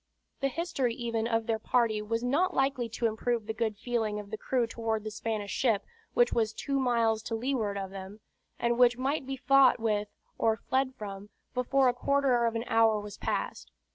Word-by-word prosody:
The 275 - +1
history 275 -6 -1
even 230 -2 -2
of 225 -1 0
their 225 -1 0
party 220 -2 +1
was 230 +2 -2
not 325 +9 +1
likely 270 -3 +1
to 230 +1 -3
improve 225 0 0
the 220 - -3
good 220 -2 -1
feeling 220 -2 -1
of 205 0 -9
the - - -2
crew 250 +1 0
toward 225 -1 -2
the 215 - -5
Spanish 215 -1 -3
ship 225 -6 +1 0.3
which 485 0 +4
was 220 -1 +1
two 275 +3 -2
miles 230 -4 +2
to 225 - -3
leeward 225 -4 -1
of 195 -1 -4
them, 195 +2 -8 0.4
and 235 0 0
which 245 -1 +5
must 270 +2 -1
be 270 0 -3
fought 275 -1 +5
with, 210 -2 0 0.3
or 220 -1 +2
fled 260 +3 -1
from, 200 -1 -7 0.2
before 260 +1 +2
a 245 - +3
quarter 255 -2 +2
of 230 - -2
an 230 - -1
hour 225 -2 +3
was 205 0 -9
past. - - -3
230 Hz, 200 wpm, -29 LUFS, 220-255 Hz, 0.4 s, which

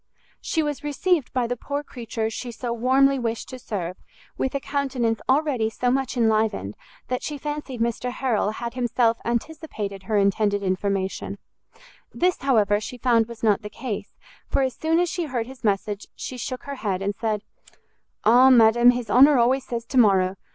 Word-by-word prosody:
She 320 - 0
was 295 -1 -3
received 295 0 0
by 250 -2 0
the 245 +1 -2
poor 285 +4 -4
creature 230 -4 -4
she 240 +2 -5
so 235 +1 -4
warmly 265 +3 +3
wished 230 -2 -3
to 255 - -8
serve 185 -6 -4 0.4
with 265 - -2
a - - +1
countenance 265 -5 -1
already 265 -5 +2
so 245 +2 0
much 265 -1 -1
enlivened, 220 - +1 0.3
that 250 0 -2
she 295 - -4
fancied 295 -3 -5
Mr 235 +2 -1
Harrel 245 -5 0
had 235 +1 -5
himself 240 -2 +1
anticipated 235 - -4
her 210 +3 -1
intended 200 0 +2
information: 190 0 -2 0.7
this, 360 +1 +1
however, 210 -7 +2
she 250 - -7
found 235 -2 +2
was 235 -1 -11
not 215 -1 +3
the 210 - -7
case, 220 -1 -6 0.3
for 275 - +1
as 260 -1 -1
soon 320 +1 +1
as 355 - +2
she 345 0 -2
heard 250 -6 -2
his 260 0 -13
message, 205 0 -1
she 255 - -6
shook 250 +1 -5
her 280 -1 -6
head, 195 -3 -1
and 200 +1 -1
said, 215 -1 -2 0.8
"Ah, 245 +4 +7
madam, 240 -1 +6
his 245 -1 +1
honour 275 +4 +7
always 255 +2 +2
says 235 -1 -4
to 260 +2 +1
morrow! 190 -4 +4
240 Hz, 180 wpm, -24 LUFS, 220-265 Hz, 0.8 s, Ah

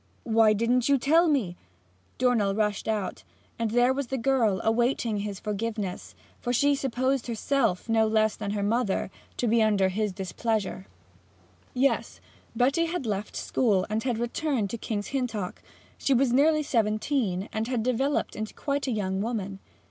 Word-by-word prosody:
'Why 225 -1 +4
didn't 235 +4 +1
you 280 - +5
tell 320 +7 +4
me?' 245 - +1 0.6
Dornell 230 -6 +2
rushed 210 -2 -1
out, 210 -4 -2 0.4
and 230 -1 0
there 245 +3 +3
was 275 -1 -3
the 265 - -2
girl 230 -6 +2
awaiting 235 -1 +1
his 200 -2 -4
forgiveness, 210 -2 -4 0.2
for 245 - -2
she 285 +4 +3
supposed 265 -1 -1
herself, 230 -4 0
no 225 -1 +3
less 220 0 +2
than 205 -2 -5
her 205 0 -1
mother, 210 -2 0 0.3
to 245 - 0
be 230 +1 +3
under 205 -3 +3
his 210 +2 -1
displeasure. 190 - -3 0.9
Yes, 270 +2 +1 0.4
Betty 275 +8 +2
had 335 -4 -3
left 210 -1 -3
school, 205 -7 +1
and 215 +1 0
had 245 -1 -1
returned 240 -2 -1
to 235 - -3
King's 205 -2 -3
Hintock. 230 -9 -3 0.4
She 275 - +2
was 250 -1 +2
nearly 305 +3 +4
seventeen, 215 -4 0
and 220 +1 -1
had 245 -3 -1
developed 260 +4 0
to 215 0 -5
quite 280 -1 -2
a - - 0
young 190 -3 -1
woman. 200 -4 -3
225 Hz, 160 wpm, -27 LUFS, 210-260 Hz, 0.9 s, you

